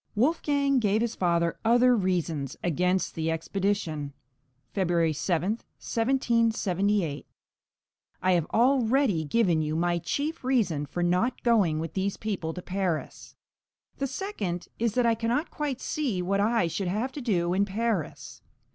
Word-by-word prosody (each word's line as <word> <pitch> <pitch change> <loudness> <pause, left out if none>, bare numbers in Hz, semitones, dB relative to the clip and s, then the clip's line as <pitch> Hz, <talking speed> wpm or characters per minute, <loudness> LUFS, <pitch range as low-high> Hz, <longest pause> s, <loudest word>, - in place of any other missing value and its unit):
Wolfgang 280 +2 +2
gave 215 -1 +2
his 235 -1 0
father 170 -2 0
other 245 +2 +5
reasons 170 - -1
against 180 +2 +1
the 160 0 -2
expedition 165 -3 -2 0.6
(February 170 -4 +1
7, 180 +8 0 0.2
1778): 220 - 0 0.9
I 185 - +2
have 170 -3 +2
already 245 - +3
given 175 -1 +2
you 155 0 -2
my 175 +1 +1
chief 285 - -3
reason 200 - +1
for 175 - -2
not 180 +9 +1
going 205 -10 +3
with 160 0 -4
these 195 +1 -1
people 195 -7 -3
to 180 - -7
Paris. 185 -4 -3 0.6
The 275 - 0
second 250 - -4
is 230 -2 0
that 250 -1 +3
I 230 - +4
cannot 235 +7 -1
quite 285 -4 -3
see 265 -11 -2
what 195 +2 0
I 220 -1 +2
should 180 +3 -2
have 215 +8 -1
to 290 - -7
do 180 -7 +1
in 195 +2 +3
Paris. 210 -4 -3
200 Hz, 140 wpm, -27 LUFS, 175-235 Hz, 0.9 s, other